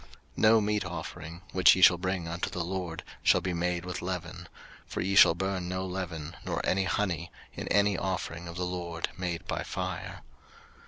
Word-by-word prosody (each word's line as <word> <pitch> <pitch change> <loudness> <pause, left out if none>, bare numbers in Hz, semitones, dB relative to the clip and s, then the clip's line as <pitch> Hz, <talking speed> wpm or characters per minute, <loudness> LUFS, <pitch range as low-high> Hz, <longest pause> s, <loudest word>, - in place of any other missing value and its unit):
03:002:011 - - -26
No 110 0 +6
meat 105 0 0
offering, 85 -1 -7
which 95 -2 +6
ye 95 - -1
shall 85 -2 +8
bring 95 -2 -2
unto 85 +1 -2
the 90 - -3
LORD, 90 -2 -4 0.2
shall - - +5
be 95 - -2
made 90 +1 -1
with 90 0 -4
leaven: 90 -1 -5 0.4
for - - -5
ye 95 +2 0
shall 85 -4 +8
burn 95 0 -2
no 95 +1 -2
leaven, 85 -4 -5
nor - - -2
any 95 +1 +2
honey, 90 -4 -1 0.2
in - - -6
any 100 0 +3
offering 85 -2 -3
of 85 - -7
the 90 - -1
LORD 85 -2 -3
made 90 -2 -3
by - - -2
fire. 90 0 -5
90 Hz, 190 wpm, -29 LUFS, 85-95 Hz, 0.4 s, shall